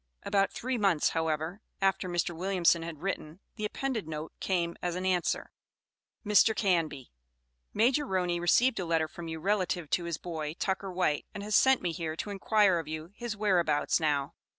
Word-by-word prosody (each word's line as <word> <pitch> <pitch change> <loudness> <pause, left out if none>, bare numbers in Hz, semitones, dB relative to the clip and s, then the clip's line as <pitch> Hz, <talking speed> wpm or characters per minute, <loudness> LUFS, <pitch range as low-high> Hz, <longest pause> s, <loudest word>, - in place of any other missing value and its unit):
About 195 -1 +2
three 255 0 -3
months, 190 -7 +3
however, 160 +4 -2 0.2
after 195 -1 +1
Mr. 175 0 -1
Williamson 175 -1 +2
had 165 -1 -7
written, 180 -3 -4 0.2
the 215 -2 -3
appended 235 - -3
note 155 0 -5
came 170 -3 -1
as 175 -1 -2
an 185 +1 -3
answer: 180 -2 0 0.7
MR. 210 +1 +5
CANBY: 165 - 0 0.6
Major 255 +6 +2
Roney 180 -3 0
received 225 +8 +3
a 180 - -2
letter 165 -1 +1
from 170 +1 -9
you 160 0 -5
relative 180 -3 -1
to 175 - +1
his 170 -3 -2
boy, 160 -2 -5
Tucker 190 +1 -2
White, 175 -5 0
and 200 - -5
has 210 0 0
sent 265 -4 +5
me 175 - 0
here 160 -2 -4
to 205 - -5
inquire 200 -2 +3
of 160 - -6
you 155 +2 -6
his 230 0 -5
whereabouts 175 -9 +2
now. 145 -3 0
180 Hz, 175 wpm, -30 LUFS, 160-200 Hz, 0.7 s, MR